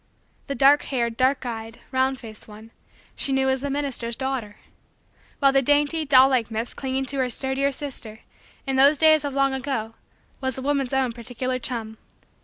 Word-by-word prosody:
The 280 - -3
dark 280 +2 +5
haired, 235 -4 -1
dark 260 +2 +1
eyed, 225 -1 -6
round 260 0 +1
faced 220 -3 -10
one, 220 +1 -13 0.4
she 275 - 0
knew 265 0 +2
as 265 -1 0
the 280 - -3
minister's 270 -5 -2
daughter. 260 -6 -4 0.8
While 275 -2 +4
the 270 0 +3
dainty, 290 +3 +1
doll 265 -2 +7
like, 255 -5 +1
miss 225 +1 -4
clinging 265 0 -3
to 275 +1 -3
her 255 -1 +1
sturdier 265 +3 0
sister, 250 -6 -5 0.4
in 270 -1 -1
those 280 +3 +6
days 310 -1 +5
of 285 -2 -4
long 275 -1 +2
ago, 260 -5 -3 0.5
was 260 -2 -1
the 265 - -6
woman's 275 -2 0
own 265 -2 +1
particular 250 +2 -4
chum. 225 -3 -3
265 Hz, 180 wpm, -24 LUFS, 235-275 Hz, 0.8 s, doll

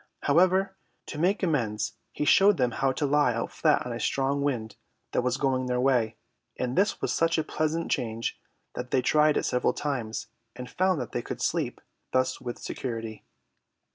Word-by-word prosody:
However, 185 +5 +3 0.3
to 150 - -6
make 190 +5 +1
amends 115 - 0 0.2
he 150 - -2
showed 195 +5 +6
them 125 -2 +2
how 135 +3 +1
to 145 +3 -1
lie 145 -4 +3
out 115 - -3
flat - - +2
on - - -4
a - - -5
strong 140 +1 0
wind 120 -7 -2 0.4
that - - +1
was 125 +1 0
going 130 -2 0
their 125 0 0
way, 125 -4 +2 0.4
and 125 +1 -2
this 200 +2 +2
was - - 0
such 165 0 +2
a 160 - +1
pleasant 155 +2 -1
change 115 -1 -2 0.3
that 125 0 -5
they 130 -1 +2
tried 150 +2 +4
it - - 0
several 125 - +1
times 120 -6 -3 0.3
and 125 +1 -7
found 185 0 +1
that 125 - -5
they - - -2
could - - -6
sleep - - -1 0.3
thus 130 0 +1
with 120 -2 -5
security. 115 -4 -5
135 Hz, 185 wpm, -27 LUFS, 120-155 Hz, 0.4 s, showed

